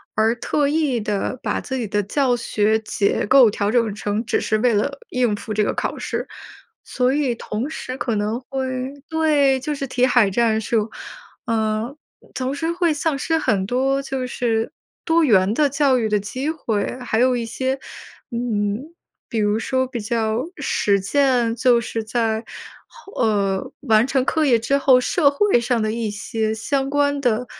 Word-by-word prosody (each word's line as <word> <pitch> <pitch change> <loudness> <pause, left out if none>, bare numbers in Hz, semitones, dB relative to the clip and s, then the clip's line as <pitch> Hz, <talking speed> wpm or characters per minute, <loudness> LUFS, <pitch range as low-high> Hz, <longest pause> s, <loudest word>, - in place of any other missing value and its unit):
而 220 +2 +3
特 285 +4 0
意 290 -5 +1
地 210 +4 -2
把 - - -1
自 265 - -5
己 230 -4 -3
的 205 +1 0
教 250 +4 +1
学 220 -1 +1
结 210 -2 0
构 255 0 +6
调 205 0 -1
整 230 -4 +1
成 210 +1 -2
只 - - +1
是 215 - 0
为 240 0 +3
了 275 +7 -1
应 245 -4 +1
付 215 +1 -6
这 210 0 +2
个 - - 0
考 - - -3
试， - - -4 0.6
所 255 +1 +1
以 275 -5 0
同 225 +6 -4
时 255 -4 -6
可 240 -3 -1
能 210 +3 -1
会 260 0 -3 0.2
对， 295 -4 +3
就 295 +3 -3
是 275 -1 -4
题 250 0 +2
海 245 -5 +4
战 220 0 +2
术， 220 0 0 0.6
呃， 220 +3 -1 0.4
同 260 +2 -2
时 325 +3 -1
会 340 -2 +1
丧 295 -1 -1
失 325 +4 0
很 200 -10 +1
多 270 +4 +1
就 270 -1 -3
是 230 -2 -1 0.3
多 330 0 +3
元 200 -6 +4
的 290 +3 +2
教 275 -2 +2
育 220 - 0
的 210 -1 +2
机 255 +9 -4
会。 245 -7 -2
还 225 -2 -1
有 255 0 +3
一 235 -1 -2
些， 260 +3 -2 0.5
嗯， 235 +4 -2 0.4
比 230 - -3
如 210 +1 +2
说 260 +2 0
比 245 -2 -5
较 220 +2 -1
实 200 -1 +1
践， 245 +1 +2
就 240 0 +4
是 225 0 -4
在， 225 0 -1 0.7
呃， 200 -4 0
完 225 -3 +4
成 265 -1 +1
课 315 +1 +1
业 245 -4 +4
之 275 +5 +1
后， 260 -2 +5
社 290 +1 +3
会 285 -2 +3
上 240 -1 0
的 215 0 0
一 225 -1 -2
些 220 +1 -2
相 270 +4 -1
关 285 0 +1
的， 245 -1 +1
245 Hz, 190 characters per minute, -21 LUFS, 220-270 Hz, 0.7 s, 构